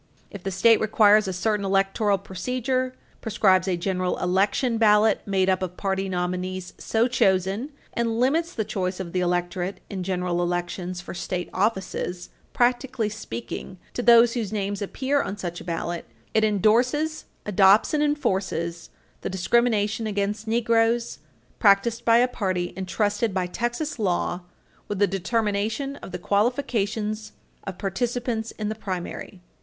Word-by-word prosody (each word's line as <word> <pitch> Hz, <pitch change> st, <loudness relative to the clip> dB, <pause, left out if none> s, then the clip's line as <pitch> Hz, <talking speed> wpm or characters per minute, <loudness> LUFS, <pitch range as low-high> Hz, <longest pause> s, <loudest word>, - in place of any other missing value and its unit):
If 200 Hz, -, -8 dB
the 195 Hz, -, -3 dB
state 215 Hz, +5 st, +4 dB
requires 215 Hz, -1 st, +5 dB
a -, -, -1 dB
certain 210 Hz, +3 st, 0 dB
electoral 195 Hz, +1 st, +2 dB
procedure, 255 Hz, +7 st, -2 dB, 0.3 s
prescribes 195 Hz, -4 st, +3 dB
a 180 Hz, -2 st, +1 dB
general 185 Hz, 0 st, -1 dB
election 205 Hz, +6 st, +1 dB
ballot 215 Hz, -1 st, +4 dB
made 190 Hz, -1 st, +2 dB
up 190 Hz, 0 st, +2 dB
of 180 Hz, -1 st, -4 dB
party 195 Hz, -1 st, -1 dB
nominees 180 Hz, 0 st, -3 dB
so 225 Hz, +2 st, +1 dB
chosen 195 Hz, +1 st, +1 dB, 0.2 s
and 230 Hz, -1 st, -1 dB
limits 320 Hz, +7 st, +2 dB
the 220 Hz, -10 st, -2 dB
choice 190 Hz, -3 st, -2 dB
of 175 Hz, -3 st, -6 dB
the 185 Hz, -, +1 dB
electorate 175 Hz, +1 st, -1 dB
in 195 Hz, -2 st, -4 dB
general 180 Hz, -1 st, -1 dB
elections 175 Hz, +1 st, -2 dB
for -, -, -8 dB
state 180 Hz, 0 st, -4 dB
offices, 190 Hz, -3 st, -2 dB, 0.2 s
practically 245 Hz, -2 st, +1 dB
speaking, 220 Hz, -3 st, -7 dB, 0.2 s
to -, -, -2 dB
those 235 Hz, 0 st, +6 dB
whose 225 Hz, -5 st, -2 dB
names 205 Hz, -1 st, -2 dB
appear 270 Hz, +7 st, 0 dB
on 200 Hz, -, -4 dB
such 175 Hz, -3 st, -5 dB
a -, -, -8 dB
ballot, 170 Hz, 0 st, -4 dB, 0.3 s
it 220 Hz, -, +3 dB
endorses, 245 Hz, -, +2 dB, 0.2 s
adopts 200 Hz, +3 st, +5 dB
and 300 Hz, -, +2 dB
enforces 190 Hz, -, -1 dB, 0.3 s
the -, -, -3 dB
discrimination 220 Hz, +2 st, +1 dB
against 205 Hz, +1 st, -2 dB
Negroes, 230 Hz, -, +1 dB, 0.4 s
practiced 220 Hz, +3 st, +3 dB
by 230 Hz, 0 st, +6 dB
a 245 Hz, +1 st, +4 dB
party 185 Hz, -7 st, -2 dB
entrusted 205 Hz, +3 st, -1 dB
by 185 Hz, -1 st, +1 dB
Texas 240 Hz, -, -3 dB
law 180 Hz, -2 st, 0 dB, 0.5 s
with 205 Hz, -, -3 dB
the 205 Hz, -, +4 dB
determination 215 Hz, +7 st, -1 dB
of -, -, -10 dB
the 180 Hz, -, -4 dB
qualifications 215 Hz, 0 st, -1 dB, 0.3 s
of 190 Hz, -2 st, -6 dB
participants 230 Hz, +2 st, -2 dB
in 215 Hz, -, -5 dB
the 215 Hz, -, -1 dB
primary. 185 Hz, -2 st, -6 dB
205 Hz, 145 wpm, -25 LUFS, 185-230 Hz, 0.5 s, those